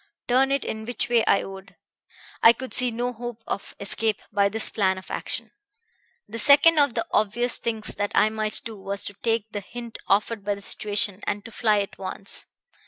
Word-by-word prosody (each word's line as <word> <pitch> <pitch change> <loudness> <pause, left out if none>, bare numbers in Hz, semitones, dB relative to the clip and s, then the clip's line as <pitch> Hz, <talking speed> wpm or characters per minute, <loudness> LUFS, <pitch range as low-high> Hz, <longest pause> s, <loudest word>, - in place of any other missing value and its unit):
Turn 265 +2 +3
it 275 -1 0 0.2
which 245 - 0
way 235 -2 +4
I - - +4
would, 195 0 -10 0.7
I 230 - +8
could 260 +2 -8
see 250 0 +5
no 240 +2 -2
hope 240 -1 -7
of - - -5
escape 210 +1 -1
by 200 0 +3
this 220 +2 +3
plan 190 -3 +1
of 185 - -10
action. - - -2 0.8
"The 225 +2 -5
second 295 +4 +6
of 285 -5 +3
the 230 - 0
obvious 235 +4 +1
things 225 -2 -2
that 205 0 -2
I 215 - +5
might 215 0 -2
do 225 -2 -7
was 200 +1 -2
to 205 - -4
take 225 -2 0
the 205 - -3
hint 235 +3 -9
offered 210 +1 +1
by 205 0 -1
the 200 - -12
situation, 205 -1 -1
and 205 0 -2
to 225 - -9
fly 215 -2 +2
at 200 - -7
once. 195 +1 -3
220 Hz, 195 wpm, -25 LUFS, 200-240 Hz, 0.8 s, I